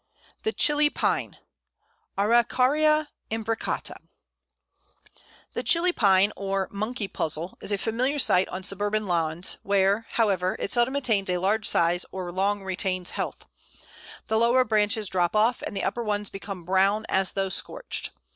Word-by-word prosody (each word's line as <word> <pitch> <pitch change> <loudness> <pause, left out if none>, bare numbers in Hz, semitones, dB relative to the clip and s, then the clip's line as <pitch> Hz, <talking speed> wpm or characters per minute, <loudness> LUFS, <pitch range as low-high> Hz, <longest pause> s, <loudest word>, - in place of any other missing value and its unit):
] - - -30
The 440 - +1
Chili 295 -6 +3
Pine - - -1 0.8
(Araucaria 260 +8 +3 0.2
imbricata). 225 0 -3 1.6
The - - -2
Chili 350 +1 +2
Pine, 200 - +3
or 195 -1 -2
"Monkey 215 +1 -3
Puzzle," 165 -1 -3
is - - -4
a 205 - +1
familiar 245 +8 -1
sight 185 -8 +3
on 185 +1 -6
suburban 205 +2 0
lawns, 170 -1 0
where, 200 +2 +1
however, 190 -5 +1
it - - -4
seldom 240 +3 +2
attains 220 -9 +1
a 180 - +1
large 200 +4 +1
size 170 +1 +2
or 185 -2 -5
long 195 +2 0
retains 185 -1 -1
health. - - -5 0.8
The 220 0 +1
lower 240 +3 +4
branches 215 -2 +1
drop 180 0 0
off, 225 +3 +2
and 200 - -5
the - - -2
upper 240 - -1
ones 210 -2 -2
become 195 -3 -7
brown, 195 +4 +2
as 190 -1 +2
though 195 -1 -1
scorched. 485 - -3
205 Hz, 145 wpm, -26 LUFS, 190-230 Hz, 1.6 s, lower